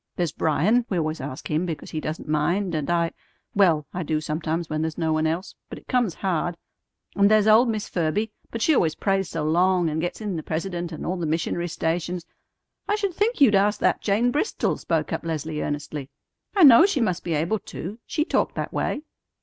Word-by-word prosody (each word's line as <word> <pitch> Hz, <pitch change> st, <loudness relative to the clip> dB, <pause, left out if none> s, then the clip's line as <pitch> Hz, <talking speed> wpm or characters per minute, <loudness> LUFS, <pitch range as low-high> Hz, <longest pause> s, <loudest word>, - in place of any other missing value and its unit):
There's 175 Hz, -4 st, -1 dB
Bryan; 180 Hz, +13 st, +2 dB
we 185 Hz, -, 0 dB
always 155 Hz, -2 st, -1 dB
ask 135 Hz, 0 st, -6 dB
him 160 Hz, +4 st, 0 dB
because 160 Hz, -4 st, -5 dB
he 155 Hz, -, -2 dB
doesn't 155 Hz, +1 st, -5 dB
mind, 170 Hz, +5 st, 0 dB
and 155 Hz, -1 st, -2 dB
I 170 Hz, -1 st, +1 dB, 0.4 s
well, 170 Hz, -7 st, +3 dB
I 180 Hz, -, -3 dB
do 155 Hz, -2 st, -1 dB
sometimes 155 Hz, +2 st, -2 dB
when 155 Hz, 0 st, -2 dB
there's 160 Hz, 0 st, -3 dB
no 160 Hz, -2 st, 0 dB
one 155 Hz, 0 st, +1 dB
else, 165 Hz, +4 st, -3 dB, 0.2 s
but -, -, -7 dB
it -, -, -15 dB
comes 245 Hz, -, +1 dB
hard; 175 Hz, -2 st, -1 dB, 0.6 s
and 200 Hz, 0 st, +5 dB
there's 215 Hz, -1 st, +4 dB
old 225 Hz, +3 st, +6 dB
Miss 215 Hz, -2 st, -2 dB
Ferby, 190 Hz, +6 st, -1 dB, 0.2 s
but 230 Hz, -, -3 dB
she 320 Hz, -, +4 dB
always 160 Hz, -, +2 dB
prays 195 Hz, -2 st, 0 dB
so 165 Hz, -2 st, -3 dB
long, 175 Hz, +1 st, +2 dB
and 160 Hz, +1 st, -1 dB
gets 175 Hz, -, -3 dB
in 205 Hz, -5 st, -3 dB
the -, -, -3 dB
president 175 Hz, +2 st, -3 dB
and 160 Hz, -, -6 dB
all 185 Hz, -, -1 dB
the 170 Hz, -2 st, -2 dB
missionary 170 Hz, +2 st, -1 dB
stations 170 Hz, +1 st, -2 dB, 0.3 s
" -, -, -54 dB
"I 415 Hz, -, +3 dB
should 400 Hz, -3 st, -1 dB
think 420 Hz, 0 st, 0 dB
you'd 250 Hz, -7 st, +7 dB
ask 205 Hz, +1 st, +3 dB
that -, -, +2 dB
Jane 220 Hz, +4 st, +2 dB
Bristol," 300 Hz, -, 0 dB
spoke -, -, -1 dB
up -, -, -3 dB
Leslie 160 Hz, -1 st, -3 dB
earnestly. 145 Hz, -1 st, -4 dB, 0.5 s
"I 385 Hz, -, +5 dB
know 275 Hz, +5 st, +9 dB
she 355 Hz, -9 st, 0 dB
must 185 Hz, -8 st, 0 dB
be 170 Hz, -2 st, -1 dB
able 170 Hz, +8 st, 0 dB
to. 200 Hz, +5 st, -7 dB
She 305 Hz, -1 st, 0 dB
talked -, -, 0 dB
that -, -, -4 dB
way." 290 Hz, -, -1 dB
175 Hz, 215 wpm, -24 LUFS, 160-210 Hz, 0.6 s, know